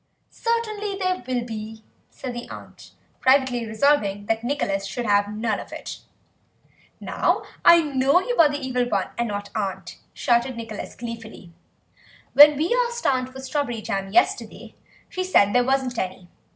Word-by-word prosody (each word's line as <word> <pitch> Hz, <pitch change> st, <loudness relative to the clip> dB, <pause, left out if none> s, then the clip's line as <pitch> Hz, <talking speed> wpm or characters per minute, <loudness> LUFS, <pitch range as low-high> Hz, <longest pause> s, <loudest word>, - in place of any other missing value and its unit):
"Certainly 435 Hz, -3 st, -2 dB
there 370 Hz, -4 st, -1 dB
will 245 Hz, -2 st, -1 dB
be," 220 Hz, -1 st, -7 dB, 0.3 s
said 255 Hz, -2 st, -7 dB
the 240 Hz, 0 st, -7 dB
aunt, -, -, -12 dB, 0.3 s
privately 260 Hz, -3 st, +2 dB
resolving 215 Hz, -4 st, +1 dB
that 225 Hz, +2 st, -1 dB
Nicholas 200 Hz, -7 st, -1 dB
should 235 Hz, +5 st, -4 dB
have 205 Hz, -1 st, +2 dB
none 215 Hz, 0 st, -1 dB
of -, -, -10 dB
it. -, -, -7 dB, 1.0 s
"Now -, -, 0 dB, 0.2 s
I 340 Hz, -1 st, +7 dB
know 275 Hz, +2 st, +3 dB
that 370 Hz, -, -7 dB
you -, -, 0 dB
are 315 Hz, -3 st, +7 dB
the 290 Hz, -, -2 dB
Evil 250 Hz, -1 st, -1 dB
One 195 Hz, -4 st, 0 dB
and 235 Hz, 0 st, -1 dB
not 205 Hz, -1 st, -5 dB
aunt," 200 Hz, -4 st, -4 dB
shouted 240 Hz, +1 st, 0 dB
Nicholas 225 Hz, -2 st, -7 dB
gleefully; 225 Hz, -6 st, -9 dB, 0.8 s
"when 295 Hz, 0 st, +9 dB
we 330 Hz, +11 st, +1 dB
asked 475 Hz, 0 st, -7 dB
aunt 255 Hz, -1 st, +1 dB
for 265 Hz, +1 st, -10 dB
strawberry 260 Hz, -4 st, -3 dB
jam 195 Hz, -1 st, -3 dB
yesterday 360 Hz, -, 0 dB, 0.3 s
she 370 Hz, -, -3 dB
said 205 Hz, -, +3 dB
there 245 Hz, 0 st, +4 dB
wasn't 260 Hz, -2 st, 0 dB
any. 185 Hz, -1 st, -5 dB
245 Hz, 160 wpm, -23 LUFS, 215-285 Hz, 1.0 s, when